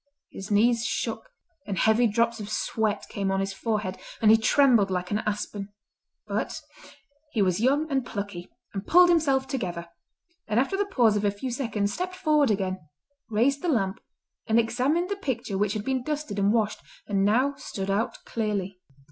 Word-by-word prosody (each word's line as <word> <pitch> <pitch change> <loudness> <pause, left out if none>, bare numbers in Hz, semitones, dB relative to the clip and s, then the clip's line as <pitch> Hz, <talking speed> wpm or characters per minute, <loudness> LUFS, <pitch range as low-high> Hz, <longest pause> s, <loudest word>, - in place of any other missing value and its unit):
His 195 - -8
knees 230 +3 +3
shook, - - -3 0.4
and 195 -2 -3
heavy 220 +2 +4
drops 230 +2 +1
of 210 -1 -6
sweat 215 -1 -1
came 200 -1 -2
on 195 - 0
his 195 0 -2
forehead, 210 -2 -2 0.2
and 215 -1 +5
he - - +8
trembled 230 -3 +4
like 180 -1 -2
an 210 - +1
aspen. 205 -1 -3 0.6
But - - -3 0.7
he 215 - +2
was 185 0 +1
young 280 +7 +2
and 270 -1 +1
plucky, 200 -6 -6 0.2
and 195 0 -5
pulled 355 +1 +7
himself 275 -6 +2
together, 175 -10 -4 0.6
and 220 +2 +2
after 275 +9 +1
the 400 +1 0
pause 235 - +3
of 205 - 0
a 205 - +3
few 205 +6 -5
seconds 215 -5 -1
stepped 365 0 -3
forward 305 -7 +2
again, 190 -2 -1 0.5
raised 250 +6 +2
the 355 - -1
lamp, 195 -8 0 0.5
and 220 0 +3
examined 275 +9 +1
the 405 - -1
picture 245 - -3
which 205 +1 +1
had 215 -1 -4
been 265 -1 0
dusted 295 -7 -3
and 200 +1 +3
washed, 215 -2 0 0.2
and 195 -2 0
now 250 +8 +3
stood 195 0 -4
out 210 +4 -1
clearly. 200 -4 -3
220 Hz, 180 wpm, -26 LUFS, 200-265 Hz, 0.7 s, he